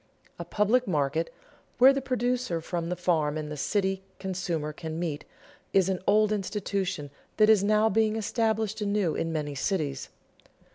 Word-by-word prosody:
A - - -5
public 220 +4 +2
market, 155 -1 0 0.5
where 265 +2 +8
the 275 - -1
producer 250 -7 -1
from 170 +1 -4
the 180 - -1
farm 160 -4 +1
and 150 -1 -5
the - - -4
city 190 +5 0 0.2
consumer 175 -5 -3
can 160 +1 -6
meet, 155 -4 -3 0.5
is 190 -1 +4
an 185 -1 0
old 215 0 +4
institution 195 -7 -2 0.3
that 215 0 +6
is 205 -3 +4
now 215 +1 +3
being 220 +1 +2
established 220 -1 -1
anew 200 -5 +1
in 165 - -2
many 150 -2 -2
cities. 140 -2 -2
190 Hz, 155 wpm, -28 LUFS, 160-215 Hz, 0.5 s, where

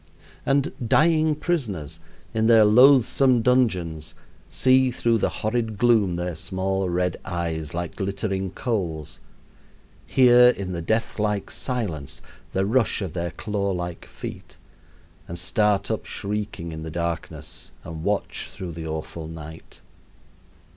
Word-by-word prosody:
And 140 0 +2 0.2
dying 155 +1 +4
prisoners, 100 - -3 0.3
in 110 0 +2
their 115 -2 +7
loathsome 125 +1 +5
dungeons, 95 -12 +1 0.3
see 130 0 +4
through 115 -2 +1
the - - +1
horrid 110 -1 -2
gloom 110 -5 +3
their 85 0 -3
small 95 +3 -2
red 90 0 0
eyes, 85 -4 -3
like 85 -1 -4
glittering 95 -1 -2
coals, 85 - -3 0.9
hear 125 -1 +6
in 100 -6 -2
the 85 -2 -3
death 110 +6 -1
like 105 -2 -1
silence 90 - -4 0.3
the 95 0 0
rush 115 -1 +1
of 90 -5 -5
their 85 -1 -2
claw 100 -1 -3
like 85 -1 -5
feet, - - -9 0.7
and 85 - -6
start 105 0 +1
up 110 - -3
shrieking 100 -5 -4
in 80 0 -6
the 80 - -6
darkness 85 0 -5
and 80 -1 -7
watch 100 +2 -2
through 90 -2 -7
the 80 0 -6
awful 80 +1 -5
night. 80 0 -10
100 Hz, 130 wpm, -24 LUFS, 85-115 Hz, 0.9 s, their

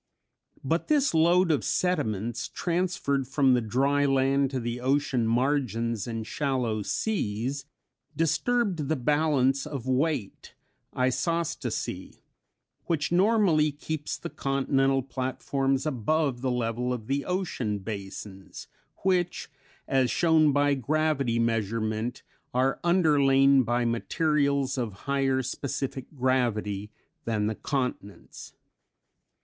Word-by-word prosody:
But 165 +5 -1
this 290 - +2
load 170 +2 +4
of 150 - +1
sediments, 120 - -1
transferred 170 -7 -1
from 135 -1 +3
the 125 - +3
dry 140 +6 +1
land 135 0 +2
to 130 -1 -3
the 120 0 -3
ocean 130 -3 +1
margins 115 -3 0
and 115 -2 -4
shallow 125 -6 -1
seas, 130 - -2 0.5
disturbed 165 - 0
the 160 - +2
balance 140 -1 +1
of 140 -5 -6
weight 130 -4 -2 0.4
(isostasy) 160 +6 -2 0.6
which 150 -2 -1
normally 180 -5 +3
keeps 150 +1 -4
the - - -7
continental 135 -1 +1
platforms 135 +1 -1
above 140 -1 0
the 130 - 0
level 125 0 -1
of 120 -3 -4
the 140 +4 -1
ocean 165 - -2
basins 95 -1 -8 0.4
(which 180 -4 0 0.4
as 130 -2 +2
shown 160 -3 +4
by 145 0 +3
gravity 140 -2 0
measurement 115 +1 -1 0.3
are 130 +2 +1
underlain 140 -6 +4
by 120 0 0
materials 140 +2 0
of 110 -5 -4
higher 135 -1 +1
specific 135 +1 -4
gravity 115 -6 0 0.4
than 110 -2 0
the 110 - 0
continents). 125 - -5
135 Hz, 110 wpm, -27 LUFS, 120-150 Hz, 0.6 s, load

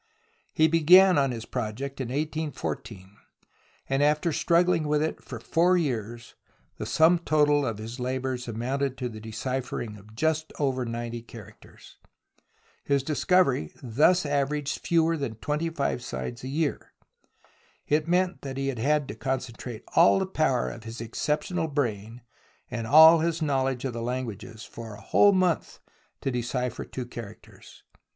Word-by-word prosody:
He 155 - +4
began 175 +2 +6
on 135 -1 +2
his 115 -3 -5
project 130 +4 -4
in 130 - -3
1814 125 -9 -4 0.7
and, 135 +1 0
after 150 +3 +2
struggHng 170 0 +2
with 150 0 +2
it 160 - -3
for 120 - -8
four 175 +9 +2
years, 120 -6 -3 0.5
the - - -4
sum 165 +2 +4
total 150 -3 +3
of 115 -3 -3
his 115 +4 -7
labours 130 0 -3
amounted 130 +4 -2
to 125 - -3
the 110 -2 -9
deciphering 115 0 -4
of 105 +2 -16
just 155 +3 0
over 130 -3 0
ninety 115 0 -4
characters. 115 -3 -14 0.9
His 140 -1 +1
discovery 150 - +2
thus 150 +9 +3
averaged 145 0 -1
fewer 165 -1 +2
than 135 -6 -4
twenty 150 +8 -2
five 140 -6 -2
signs 70 - -6
a - - -5
year. 145 +2 -2 0.9
It 150 +1 +1
meant 180 +1 +1
that 135 -1 -6
he 135 0 -1
had 140 +3 0
to - - -5
concentrate 125 -3 -5
all 170 +3 +6
the 190 - 0
power 155 -9 0
of 115 - -10
his 115 +1 -8
exceptional 150 +8 -2
brain, 120 -5 -3 0.5
and 115 -2 -4
aU 160 +5 +9
his 165 0 0
knowledge 135 -4 0
of 130 - -2
languages, 115 -2 -5
for 115 -2 -9
a 105 - -13
whole 205 - +5
month 185 -3 0 0.4
to 135 - -1
decipher 125 0 -3
two 125 - -6
characters. 115 -3 -12
135 Hz, 145 wpm, -27 LUFS, 120-155 Hz, 0.9 s, aU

